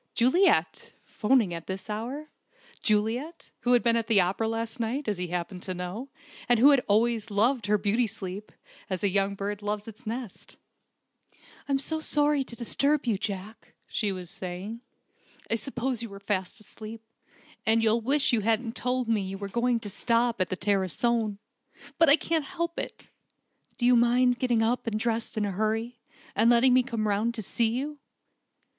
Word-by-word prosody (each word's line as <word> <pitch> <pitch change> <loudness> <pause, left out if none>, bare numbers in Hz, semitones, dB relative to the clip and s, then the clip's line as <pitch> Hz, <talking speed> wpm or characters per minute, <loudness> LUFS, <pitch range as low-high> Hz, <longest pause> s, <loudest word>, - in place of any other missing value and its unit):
Juliet! 260 +11 +3
'phoning 220 -5 +2
at 165 -1 -7
this 190 0 -5
hour! 245 +8 -5 0.5
Juliet, 235 +9 -1
who 245 - +2
had 245 - +4
been 235 -1 +3
at 230 -1 0
the 220 -3 +4
opera 190 +5 +1
last 225 +2 -3
night, 240 +5 -2
as 205 -4 -1
he 180 - -2
happened 180 +1 -4
to 185 0 -5
know, 180 +9 -5 0.4
and 240 - +5
who 270 +6 +7
had 275 -3 +4
always 225 +1 +2
loved 220 +2 +1
her 210 +1 +3
beauty 215 +4 +1
sleep, 200 -1 -7 0.4
as 185 -1 -3
a 200 - +3
young 195 +1 +1
bird 200 +1 -4
loves 210 +1 -3
its 225 +2 -11
nest! 230 -2 -6 1.1
"I'm 275 -1 +2
sorry 295 -1 +1
to 235 - -9
disturb 275 +5 +1
you, 220 -5 0
Jack," 205 +2 -6
she 210 -3 -1
was 180 -2 -6
saying. 195 +3 -6 0.7
"I - - +3
suppose 250 0 -2
you 230 - -5
were 200 0 -10
fast 195 -1 -2
asleep, 220 +1 -8 0.6
and 225 +1 +3
you'll 225 +1 +3
wish 270 +3 +2
you 235 - +4
hadn't 225 +2 0
told 250 -1 -1
me 225 -2 +2
you 195 0 -5
were 200 0 -5
going 240 +3 +1
to 210 - -7
stop 235 +1 +1
at 185 - +2
the 185 - -2
Tarascon. 205 +3 0 0.6
But 330 -2 +6
I 285 - +8
can't 320 -2 -1
help 340 -1 -3
it! - - -6 0.7
Do 240 - 0
you 250 0 +6
mind 245 +1 +3
getting 240 -3 +2
up 240 +2 0
and 215 -1 -1
dressing 225 -1 -1
in 205 - 0
a - - -3
hurry, 225 +4 -1 0.4
and 225 +3 +4
letting 240 +2 +5
me 255 - +6
come 230 -4 -2
round 215 +3 0
to 220 - -3
see 230 +3 +1
you?" 285 +6 -3
225 Hz, 180 wpm, -27 LUFS, 205-245 Hz, 1.1 s, I